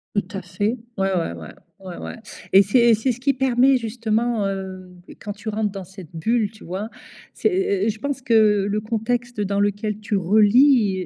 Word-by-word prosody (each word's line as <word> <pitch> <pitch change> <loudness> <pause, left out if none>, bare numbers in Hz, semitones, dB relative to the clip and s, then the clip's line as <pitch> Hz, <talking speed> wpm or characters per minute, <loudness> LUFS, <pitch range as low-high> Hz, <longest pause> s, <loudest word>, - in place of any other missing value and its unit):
Tout 205 -3 0
à - - -5
fait. 205 +6 -2 0.2
Ouais 195 0 +1
ouais 170 - -1
ouais 85 -2 -10 0.3
ouais 185 -2 -9
ouais, - - -7 0.4
et 195 - +8
c'est 200 +5 +3
et 235 -1 +6
c'est 225 +4 +1
ce 240 - -13
qui 275 +1 +2
permet, 265 0 +3
justement, 230 -1 -1
heu, 190 -1 -6 0.3
quand 210 - -5
tu 215 +2 -13
rentres 210 -1 -1
dans 195 -1 -7
cette 190 -2 -12
bulle, 215 +6 0
tu 215 - -16
vois. 190 +5 -5 0.4
C'est - - 0
é 365 - 0
é - - +2
je 220 0 -4
pense 280 +2 -3
que 215 -4 +3
le 210 +1 -1
contexte 235 +2 -2
dans 200 -1 0
lequel 205 +1 -1
tu 205 0 -1
relis, 210 +1 +4
210 Hz, 200 wpm, -22 LUFS, 195-235 Hz, 0.4 s, et